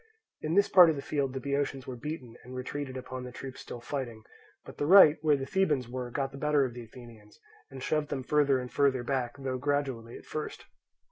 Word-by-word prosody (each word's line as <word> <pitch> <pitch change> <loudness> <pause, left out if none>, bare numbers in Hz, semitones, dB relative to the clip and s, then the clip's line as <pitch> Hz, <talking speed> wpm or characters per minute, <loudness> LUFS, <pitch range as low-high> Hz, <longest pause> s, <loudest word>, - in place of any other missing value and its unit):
In 155 +2 -1
this 200 0 +5
part 180 -3 +8
of 160 - +1
the 140 - -4
field 140 -3 -1
the 135 - -3
Boeotians 140 -1 -2
were 130 - -6
beaten, 130 -2 -6
and 125 +1 -10
retreated 130 +1 -5
upon 130 0 -6
the 125 - -7
troops 130 +1 -8
still 120 - -8
fighting; 120 -4 -5 0.4
but - - -12
the 145 - 0
right, 170 -4 +8
where 150 -2 +3
the 135 - -4
Thebans 150 -8 +1
were, 125 0 -5
got 135 +2 -2
the 140 - -9
better 150 -2 +3
of 125 - -5
the 120 0 -8
Athenians 115 -3 -15 0.3
and 135 -1 -9
shoved 150 0 0
them 135 -2 -3
further 145 -1 +3
and 125 -1 -5
further 135 -3 +2
back, 125 -2 -2
though 130 -2 -3
gradually 135 -5 -2
at - - -15
first. 155 - -6
135 Hz, 220 wpm, -30 LUFS, 125-145 Hz, 0.4 s, part